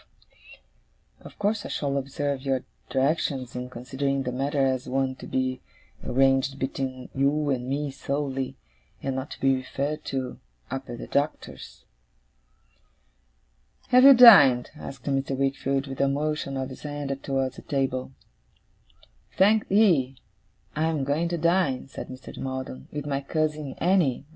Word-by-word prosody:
Of -, -, -14 dB
course 205 Hz, +1 st, 0 dB
I -, -, -7 dB
shall 140 Hz, -1 st, -2 dB
observe 140 Hz, 0 st, -2 dB
your 135 Hz, -2 st, -1 dB, 0.3 s
directions, 135 Hz, -2 st, 0 dB
in 125 Hz, 0 st, -5 dB
considering 135 Hz, +2 st, -2 dB
the 125 Hz, -, -3 dB
matter 135 Hz, +2 st, 0 dB
as 130 Hz, -1 st, -1 dB
one 130 Hz, 0 st, 0 dB
to -, -, -10 dB
be 130 Hz, 0 st, -1 dB, 0.4 s
arranged 135 Hz, +1 st, +2 dB
between 130 Hz, -1 st, -4 dB
you 140 Hz, +2 st, +1 dB
and 125 Hz, -1 st, -2 dB
me 145 Hz, +1 st, -2 dB
solely, 135 Hz, -1 st, -3 dB, 0.5 s
and 135 Hz, -1 st, -2 dB
not 130 Hz, +2 st, -4 dB
to -, -, -8 dB
be 135 Hz, 0 st, +3 dB
referred 140 Hz, +4 st, -3 dB
to, 130 Hz, -2 st, -4 dB, 0.3 s
up 135 Hz, 0 st, -5 dB
at 120 Hz, -, -5 dB
the -, -, -7 dB
Doctor's.' 145 Hz, +2 st, -3 dB, 2.0 s
'Have 250 Hz, 0 st, +6 dB
you 275 Hz, 0 st, +10 dB
dined?' 155 Hz, -, +8 dB
asked 135 Hz, -4 st, -9 dB
Mr. 135 Hz, -1 st, -1 dB
Wickfield, 135 Hz, 0 st, 0 dB
with 135 Hz, -1 st, -5 dB
a 140 Hz, -, +4 dB
motion 145 Hz, 0 st, -2 dB
of 130 Hz, 0 st, -3 dB
his 130 Hz, -, -10 dB
hand 145 Hz, -2 st, -4 dB
towards 135 Hz, -2 st, -2 dB
the -, -, -8 dB
table. 135 Hz, -2 st, -2 dB, 1.3 s
'Thank'ee. 195 Hz, -9 st, +4 dB, 0.6 s
I 155 Hz, +1 st, +1 dB
am 160 Hz, -4 st, 0 dB
going 150 Hz, +5 st, 0 dB
to 170 Hz, -, -1 dB
dine,' 170 Hz, -6 st, +1 dB
said -, -, -7 dB
Mr. 130 Hz, 0 st, -10 dB
Maldon, 130 Hz, -, -5 dB
'with 145 Hz, -1 st, -5 dB
my 140 Hz, -1 st, -1 dB
cousin 150 Hz, -1 st, -2 dB
Annie. 170 Hz, -8 st, +2 dB
135 Hz, 145 wpm, -26 LUFS, 130-150 Hz, 2.0 s, you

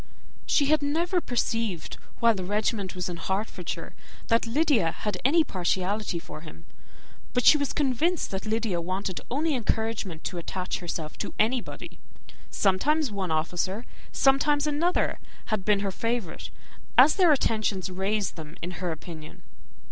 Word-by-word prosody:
She 285 Hz, -, +4 dB
had 305 Hz, +1 st, +3 dB
never 335 Hz, +5 st, +1 dB
perceived, 230 Hz, -, -2 dB, 0.2 s
while 230 Hz, -1 st, +5 dB
the 190 Hz, -3 st, -4 dB
regiment 205 Hz, 0 st, -1 dB
was 180 Hz, -1 st, -2 dB
in 175 Hz, -1 st, -4 dB
Hertfordshire, 190 Hz, -1 st, -3 dB, 0.4 s
that 230 Hz, 0 st, +3 dB
Lydia 245 Hz, -, +3 dB
had 205 Hz, +1 st, -3 dB
any 320 Hz, +5 st, +5 dB
partiality 190 Hz, -, -1 dB
for 160 Hz, -2 st, -9 dB
him; 85 Hz, -, -12 dB, 0.7 s
but 250 Hz, -, +1 dB
she -, -, +9 dB
was 285 Hz, -2 st, 0 dB
convinced 300 Hz, +5 st, +1 dB
that 190 Hz, +2 st, -4 dB
Lydia 220 Hz, -4 st, 0 dB
had 170 Hz, -, -5 dB
wanted 185 Hz, -1 st, -2 dB
only 300 Hz, +5 st, +1 dB
encouragement 220 Hz, -, -1 dB
to 175 Hz, -, -4 dB
attach 180 Hz, +2 st, -3 dB
herself 165 Hz, -3 st, -5 dB
to -, -, -4 dB
anybody. 235 Hz, +3 st, -1 dB, 0.5 s
Sometimes 265 Hz, +9 st, +2 dB
one 195 Hz, -3 st, -2 dB
officer, 175 Hz, +7 st, -1 dB, 0.3 s
sometimes 285 Hz, +2 st, +3 dB
another, 305 Hz, +4 st, +1 dB, 0.3 s
had 210 Hz, -3 st, 0 dB
been 205 Hz, 0 st, +3 dB
her 200 Hz, -1 st, -1 dB
favourite, 230 Hz, -3 st, -3 dB, 0.5 s
as 275 Hz, +5 st, +8 dB
their 360 Hz, -5 st, +5 dB
attentions 215 Hz, -8 st, +1 dB
raised 195 Hz, +2 st, -1 dB
them 155 Hz, 0 st, -8 dB
in 175 Hz, -, -3 dB
her 180 Hz, -2 st, -1 dB
opinion. 160 Hz, -1 st, -9 dB
210 Hz, 150 wpm, -27 LUFS, 180-270 Hz, 0.7 s, she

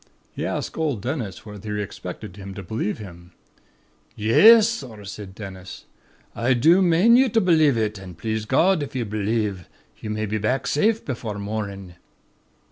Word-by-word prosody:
He -, -, -4 dB
asked -, -, -4 dB
old 145 Hz, -10 st, -1 dB
Dennis 120 Hz, -, -4 dB
whether 105 Hz, 0 st, -6 dB
he 105 Hz, -, -1 dB
expected 95 Hz, -2 st, -8 dB
him 100 Hz, -1 st, -9 dB
to 100 Hz, -, -7 dB
believe 110 Hz, 0 st, -3 dB
it. 95 Hz, -5 st, -9 dB, 1.0 s
"'Yes, 215 Hz, -, +7 dB
sorr,' 125 Hz, -, -6 dB
said 100 Hz, -1 st, -8 dB
Dennis, 95 Hz, -3 st, -9 dB, 0.5 s
'I 125 Hz, +2 st, +2 dB
do 165 Hz, +10 st, +5 dB
mane 185 Hz, +6 st, +5 dB
ye 260 Hz, 0 st, +4 dB
to 225 Hz, -, +2 dB
b'lieve 155 Hz, -, +3 dB
it; 105 Hz, -2 st, -1 dB
an' 95 Hz, -2 st, -10 dB
please 110 Hz, +4 st, -3 dB
God, 165 Hz, -, +3 dB
if 140 Hz, -, -6 dB
ye'll 125 Hz, -3 st, -1 dB
b'lieve, 105 Hz, -3 st, -2 dB, 0.3 s
ye 105 Hz, -, -7 dB
may 110 Hz, 0 st, -2 dB
be 110 Hz, +1 st, -2 dB
back 125 Hz, +6 st, -1 dB
safe 220 Hz, +9 st, +1 dB
befor' 115 Hz, -6 st, -4 dB
mornin'.' 100 Hz, -3 st, -5 dB
110 Hz, 165 wpm, -23 LUFS, 100-145 Hz, 1.0 s, Yes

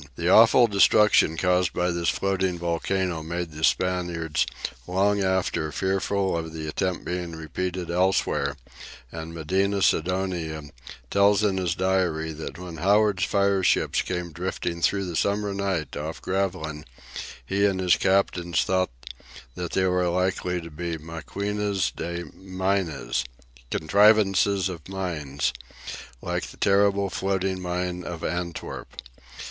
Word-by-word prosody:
The 85 Hz, +5 st, -1 dB
awful 115 Hz, +4 st, +7 dB
destruction 105 Hz, -5 st, +4 dB
caused 90 Hz, 0 st, +2 dB
by 90 Hz, 0 st, +1 dB
this 85 Hz, 0 st, 0 dB
floating 95 Hz, -2 st, 0 dB
volcano 85 Hz, 0 st, -1 dB
made 85 Hz, +1 st, -4 dB
the 75 Hz, +1 st, -8 dB
Spaniards 85 Hz, -3 st, +1 dB, 0.4 s
long 100 Hz, +3 st, +2 dB
after 95 Hz, -4 st, 0 dB
fearful 95 Hz, +2 st, 0 dB
of 80 Hz, -1 st, -4 dB
the 80 Hz, -1 st, -5 dB
attempt 90 Hz, +4 st, -2 dB
being 90 Hz, -1 st, -3 dB
repeated 90 Hz, +3 st, -4 dB
elsewhere, 85 Hz, -6 st, +1 dB, 0.5 s
and 80 Hz, 0 st, -6 dB
Medina 95 Hz, +5 st, 0 dB
Sidonia 85 Hz, -3 st, 0 dB, 0.5 s
tells 100 Hz, +1 st, +4 dB
in 100 Hz, -2 st, +2 dB
his 90 Hz, -2 st, 0 dB
diary 90 Hz, -4 st, 0 dB
that 75 Hz, -2 st, -7 dB
when 90 Hz, -2 st, -8 dB
Howard's 100 Hz, +2 st, +3 dB
fireships 100 Hz, -1 st, +2 dB
came 90 Hz, -2 st, -4 dB
drifting 85 Hz, 0 st, -3 dB
through 100 Hz, +2 st, +2 dB
the 85 Hz, -2 st, -5 dB
summer 100 Hz, +3 st, 0 dB
night 95 Hz, -5 st, -2 dB
off 80 Hz, +2 st, -5 dB
Gravelines, 90 Hz, -6 st, -2 dB, 0.6 s
he 100 Hz, +7 st, +2 dB
and 95 Hz, -2 st, -1 dB
his 90 Hz, -1 st, +4 dB
captains 90 Hz, -3 st, +1 dB
thought 95 Hz, 0 st, +1 dB, 0.6 s
that 90 Hz, +3 st, -5 dB
they 95 Hz, -, +2 dB
were 90 Hz, -1 st, +2 dB
likely 90 Hz, 0 st, 0 dB
to 85 Hz, 0 st, -10 dB
be 85 Hz, +2 st, -4 dB
maquinas 100 Hz, +5 st, -2 dB
de 85 Hz, +1 st, -4 dB
minas, 95 Hz, -8 st, -1 dB, 0.5 s
"contrivances 100 Hz, -, +4 dB
of 90 Hz, -2 st, -8 dB
mines," 75 Hz, -9 st, -2 dB, 0.7 s
like -, -, -2 dB
the -, -, -13 dB
terrible 100 Hz, 0 st, +3 dB
floating 95 Hz, -1 st, -1 dB
mine 90 Hz, 0 st, -2 dB
of 85 Hz, -2 st, -6 dB
Antwerp. 85 Hz, -2 st, -4 dB
90 Hz, 130 wpm, -25 LUFS, 85-95 Hz, 0.7 s, awful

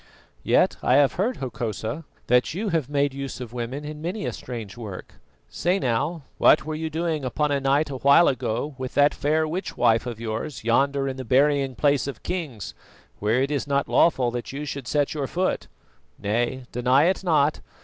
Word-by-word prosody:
"Yet -, -, +3 dB
I 125 Hz, -, +3 dB
have 140 Hz, -2 st, +4 dB
heard, 225 Hz, +8 st, -1 dB
Hokosa, 120 Hz, +2 st, -4 dB, 0.2 s
that 125 Hz, +5 st, +2 dB
you 210 Hz, +3 st, -2 dB
have 160 Hz, -7 st, -1 dB
made 145 Hz, -1 st, +1 dB
use 135 Hz, -1 st, -5 dB
of 120 Hz, -2 st, -7 dB
women 125 Hz, +4 st, -4 dB
in 150 Hz, 0 st, -7 dB
many 185 Hz, +6 st, -3 dB
a -, -, -2 dB
strange 115 Hz, -6 st, -7 dB
work. 105 Hz, -6 st, -9 dB, 0.3 s
Say 180 Hz, +2 st, 0 dB
now, 145 Hz, +2 st, -1 dB, 0.2 s
what 135 Hz, -, +5 dB
were 155 Hz, -, -3 dB
you 160 Hz, +1 st, -3 dB
doing 160 Hz, -2 st, -2 dB
upon 145 Hz, +4 st, 0 dB
a 140 Hz, -, +2 dB
night 140 Hz, +2 st, +1 dB
a 135 Hz, -, -4 dB
while 140 Hz, +6 st, +6 dB
ago 130 Hz, +2 st, -1 dB
with 130 Hz, -1 st, -5 dB
that 145 Hz, 0 st, +5 dB
fair 155 Hz, +2 st, +1 dB
witch 180 Hz, +5 st, -4 dB
wife 115 Hz, +2 st, +3 dB
of 120 Hz, -2 st, -5 dB
yours 115 Hz, +5 st, -4 dB
yonder 135 Hz, +4 st, +2 dB
in 135 Hz, -1 st, -4 dB
the 130 Hz, -, -5 dB
burying 135 Hz, +1 st, +2 dB
place 140 Hz, -2 st, +2 dB
of 140 Hz, -, -7 dB
kings, 150 Hz, -, -4 dB, 0.5 s
where 110 Hz, +5 st, +2 dB
it 140 Hz, -, -2 dB
is 145 Hz, -1 st, -1 dB
not 140 Hz, 0 st, +1 dB
lawful 130 Hz, -7 st, +3 dB
that 120 Hz, 0 st, -5 dB
you 145 Hz, +2 st, -5 dB
should 140 Hz, -1 st, -6 dB
set 145 Hz, -2 st, +1 dB
your 145 Hz, -3 st, -2 dB
foot? 185 Hz, +5 st, -1 dB, 0.5 s
Nay, 120 Hz, +5 st, -1 dB
deny 125 Hz, +3 st, +3 dB
it 185 Hz, +3 st, +1 dB
not. 155 Hz, -4 st, +2 dB
140 Hz, 195 wpm, -24 LUFS, 125-155 Hz, 0.5 s, while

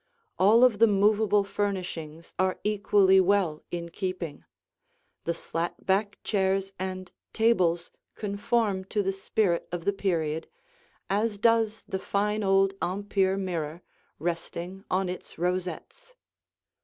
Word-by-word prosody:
All 215 Hz, +6 st, +6 dB
of 235 Hz, -5 st, +5 dB
the 230 Hz, -, +7 dB
movable 210 Hz, 0 st, +3 dB
furnishings 180 Hz, -6 st, -4 dB
are 185 Hz, 0 st, +1 dB
equally 200 Hz, -2 st, +4 dB
well 185 Hz, -5 st, +2 dB
in 170 Hz, -1 st, -4 dB
keeping; 180 Hz, -4 st, -4 dB, 0.8 s
the 170 Hz, -, +1 dB
slat 170 Hz, +1 st, -4 dB
back 200 Hz, +2 st, +1 dB
chairs 195 Hz, -1 st, 0 dB
and 185 Hz, -1 st, -5 dB, 0.2 s
tables 180 Hz, -7 st, +2 dB, 0.2 s
conform 205 Hz, -1 st, 0 dB
to 205 Hz, +1 st, -1 dB
the 195 Hz, 0 st, 0 dB
spirit 195 Hz, -2 st, 0 dB
of 175 Hz, -1 st, -4 dB
the 200 Hz, -, +2 dB
period, 165 Hz, -5 st, -1 dB, 0.6 s
as 210 Hz, +2 st, 0 dB
does 225 Hz, 0 st, +2 dB
the 190 Hz, -, -3 dB
fine 210 Hz, +2 st, 0 dB
old 195 Hz, 0 st, +3 dB
Empire 195 Hz, 0 st, 0 dB
mirror, 170 Hz, -3 st, -3 dB, 0.3 s
resting 175 Hz, +3 st, -4 dB
on 185 Hz, +1 st, +1 dB
its 180 Hz, 0 st, -7 dB
rosettes. 185 Hz, -, -3 dB
195 Hz, 120 wpm, -27 LUFS, 175-205 Hz, 0.8 s, the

